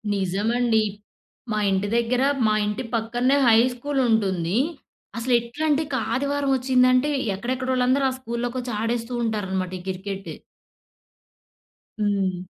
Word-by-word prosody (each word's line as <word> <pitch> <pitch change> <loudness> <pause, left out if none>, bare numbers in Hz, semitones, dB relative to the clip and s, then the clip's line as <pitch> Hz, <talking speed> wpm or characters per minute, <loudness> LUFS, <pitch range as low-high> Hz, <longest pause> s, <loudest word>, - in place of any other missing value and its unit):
నిజమండి. 220 +5 +1 0.7
మా 215 - 0
ఇంటి 195 +1 0
దగ్గర 240 +2 +1 0.2
మా 215 - +3
ఇంటి 210 +4 -2
పక్కనేే 240 +4 +1
హై 225 -1 +7
స్కూల్ 275 +3 -3
ఉంటుంది. 190 -4 +1 0.6
అసలేట్లాంటే 255 +6 +1
ఇక 280 - -3 0.2
ఆదివారం 280 +2 0
వచ్చిందంటే, 255 +1 +3 0.3
ఎక్కడెక్కడోళ్ళందరూ 255 +4 0
ఆ - - -5
స్కూల్లోకొచ్చి 245 0 -4
ఆడేస్తూ 230 +1 -2
ఉంటారనమాట 190 -5 -2
ఈ - - -10
క్రికెట్. 195 +1 -5 1.7
హ్మ్. 195 -3 0
235 Hz, 105 wpm, -24 LUFS, 205-255 Hz, 1.7 s, హై